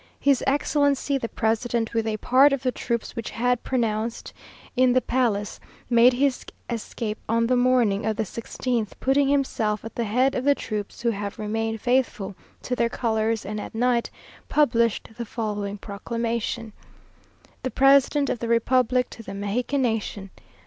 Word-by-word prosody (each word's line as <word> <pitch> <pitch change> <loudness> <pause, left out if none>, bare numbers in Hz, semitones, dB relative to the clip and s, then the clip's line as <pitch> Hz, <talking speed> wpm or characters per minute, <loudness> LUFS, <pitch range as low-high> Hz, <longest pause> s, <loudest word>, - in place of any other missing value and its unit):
His 275 -3 +3
Excellency 285 0 +1
the 230 - -4
President, 225 +1 -1
with 225 -1 0
a 215 -1 -1
part 270 +6 +5
of 270 -2 -2
the 255 - +1
troops 235 -2 -3
which 230 - -4
had 245 +1 0
pronounced 230 -2 -2 0.4
in 255 -1 +4
the 255 - +5
palace, 230 -6 -1 0.3
made 240 +2 +6
his 265 +1 +1 0.3
escape 225 -1 -4
on 230 +1 +2
the 250 +2 +2
morning 245 -5 +3
of 220 - 0
the 220 - -1
sixteenth, 230 +1 -3
putting 270 +1 +2
himself 225 -7 0
at 225 - -7
the 235 - -2
head 255 +6 +2
of 255 - -2
the 285 +1 +4
troops 210 -4 -5
who 235 - +3
have 200 -1 -5
remained 225 +1 -2
faithful 245 -6 0 0.3
to 250 - -2
their 235 -1 +1
colours, 225 -2 -1
and 210 +1 -4
at - - -8
night 240 0 +1 0.4
published 235 -7 +2
the - - -1
following 210 -3 -3
proclamation:" 230 +2 -3 0.9
"_The 255 - -2
President 275 +1 +4
of 240 - -3
the 235 - -3
Republic 250 +2 +2
to - - -9
the 200 -3 -8
Mexican 240 +7 -1
Nation. 215 -4 -2
235 Hz, 165 wpm, -24 LUFS, 220-255 Hz, 0.9 s, made